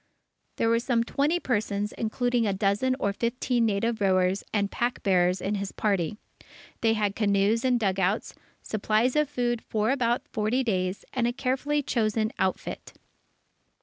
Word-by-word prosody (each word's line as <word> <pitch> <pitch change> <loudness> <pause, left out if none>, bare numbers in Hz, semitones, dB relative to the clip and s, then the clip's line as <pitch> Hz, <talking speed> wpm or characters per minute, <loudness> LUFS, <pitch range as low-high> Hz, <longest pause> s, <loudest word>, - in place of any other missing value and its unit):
There 230 - +1
were 230 0 +3
some 235 -1 +1
twenty 290 +8 0
persons, 210 -6 -1
including 240 +1 0
a 200 - +1
dozen 205 +6 +1
or 200 -4 0
fifteen 240 +1 0
native 220 +2 -1
rowers 185 0 +2
and 200 -2 0
pack 240 +1 -2
bearers, 180 -2 +3
in 195 - -2
his 200 -1 -3
party. 200 -2 -1 0.6
They 225 -1 +3
had 205 -2 0
canoes 205 +1 +2
and 250 -2 +2
dugouts, 195 0 0 0.3
supplies 220 +4 +1
of 300 -2 +2
food 240 -4 -1
for 215 +2 0
about 250 +1 0
forty 230 +2 0
days, 185 -4 -1
and 245 -2 +1
a - - +1
carefully 275 +4 -1
chosen 220 -3 0
outfit. 190 0 -2
220 Hz, 150 wpm, -27 LUFS, 200-245 Hz, 0.6 s, were